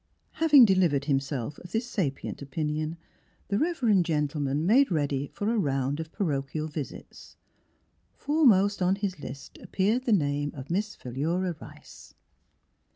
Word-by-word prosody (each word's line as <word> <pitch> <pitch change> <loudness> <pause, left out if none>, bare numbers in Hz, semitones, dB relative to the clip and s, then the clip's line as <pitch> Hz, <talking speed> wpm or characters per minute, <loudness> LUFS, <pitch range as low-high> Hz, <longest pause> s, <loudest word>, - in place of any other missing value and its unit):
Having 300 -6 +6
delivered 175 -8 +2
him 140 -2 +2
self 135 0 -5
of 175 - -12
this 225 +2 0
sapient 155 - -3
opinion, 155 +3 -3 0.5
the 200 - +1
reverend 250 - +2
gentleman 150 -2 -1
made 260 +8 +5
ready 145 -4 -1
for 210 +9 -2
a - - 0
round 135 -2 -1
of 160 0 -6
parochial 155 -3 -2
visits. 150 -3 -8 0.8
Foremost 210 -11 +3
on 180 +1 +3
his 195 -4 -4
list 135 -1 -9
appeared 215 +7 0
the 235 - +1
name 145 -6 +1
of 135 +2 -8
Miss 205 +4 -1
Philura 165 +8 -2
Rice. - - -14
165 Hz, 140 wpm, -27 LUFS, 145-205 Hz, 0.8 s, Having